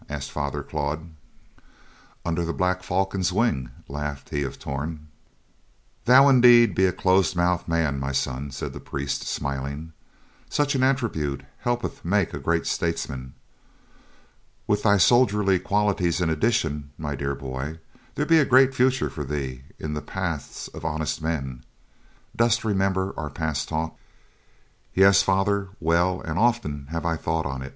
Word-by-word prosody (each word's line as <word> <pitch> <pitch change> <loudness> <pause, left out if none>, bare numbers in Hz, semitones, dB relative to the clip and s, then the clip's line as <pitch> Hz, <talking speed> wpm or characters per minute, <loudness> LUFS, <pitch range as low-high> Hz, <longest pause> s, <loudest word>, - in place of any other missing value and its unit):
asked 75 -2 -5
Father 75 0 -3
Claude. 80 +3 -4 1.1
"Under 85 0 0
the 85 0 -2
black 90 0 +1
falcon's 95 0 0
wing," 90 - 0 0.2
laughed 75 0 -5
he 75 - -1
of 70 - -4
Torn. 75 +3 -5 1.0
"Thou 130 +3 +8 0.2
be 120 -1 +8
indeed 100 -6 -1
a 95 - +4
close 95 +1 +2
mouthed 90 0 +1
man, 80 -5 0
my 65 +1 -2
son," 65 +1 -2
said 70 - -5
the - - -7
priest, 70 0 -4
smiling. 70 +4 -4 0.6
"Such 145 0 +1
an 135 - 0
attribute 115 - 0 0.2
helpeth 120 0 -2
make 95 +1 +1
a - - -4
great 80 0 0
statesman. 65 -6 -3 1.3
With 105 - +1
thy 100 -2 +4
soldierly 105 -3 +4
qualities 100 -4 +1
in 85 -3 +1
addition, 75 -5 0
my 75 -2 -3
dear 70 +1 -2
boy, 70 +3 -5 0.4
there 150 - 0
be 165 +1 +5
a - - +5
great 135 0 +5
future 130 0 +2
for 75 - -5
thee 65 -2 -4
in 75 -1 -4
the 75 - -3
paths 90 -6 -4
of - - -10
honest 80 0 -2
men. 65 -6 -3 0.7
Dost 115 0 +2
remember 95 -2 0
our 75 -1 -4
past 75 -1 -3
talk?" 80 0 -2 1.0
"Yes, 95 +1 +6
father, 95 0 +1
well; 85 +2 +2
and 80 +1 -3
often 105 - 0
have 85 0 -4
I 85 -1 0
thought 80 0 -1
on't. 65 -1 -4
85 Hz, 150 wpm, -25 LUFS, 75-100 Hz, 1.3 s, Thou